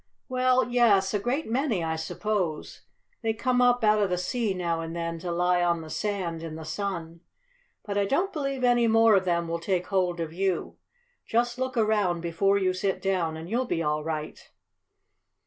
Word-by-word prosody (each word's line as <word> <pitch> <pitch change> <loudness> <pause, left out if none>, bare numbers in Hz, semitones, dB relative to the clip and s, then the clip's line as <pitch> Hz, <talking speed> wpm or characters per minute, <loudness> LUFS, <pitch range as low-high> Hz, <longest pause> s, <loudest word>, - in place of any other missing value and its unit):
"Well, 255 0 +2
yes, 220 -6 +3
a 205 - +1
great 255 +9 -1
many, 235 - 0
I 160 0 -1
suppose. 170 0 -3 0.4
They 225 -2 0
come 250 +2 +1
up 245 -1 +3
out 215 0 +4
of 200 - +1
the 180 - 0
sea 205 +2 -1
now 170 -2 -1
and 165 0 -6
then 170 -1 -3
to 175 +1 -4
lie 180 +1 +2
on 170 -1 +1
the 160 -1 -9
sand 185 -6 -2
in 165 -1 -6
the 160 0 -8
sun. 170 -2 -4 0.7
But 205 -1 -1
I 200 - +2
don't 355 - 0
believe 275 -4 -3
any 240 -1 +4
more 225 0 +5
of 190 -1 +2
them 170 -1 0
will 170 0 -2
take 180 +1 -1
hold 180 -3 0
of 165 -1 -4
you. 190 0 -2 0.5
Just 240 +2 0
look 260 -1 -2
around 210 -6 +2
before 185 +4 +1
you 185 -2 +1
sit 190 +1 -1
down, 175 -5 -1
and 160 +1 -8
you'll 240 +6 0
be 165 -8 -1
all 150 0 0
right." 155 -1 -5
195 Hz, 195 wpm, -27 LUFS, 170-230 Hz, 0.7 s, more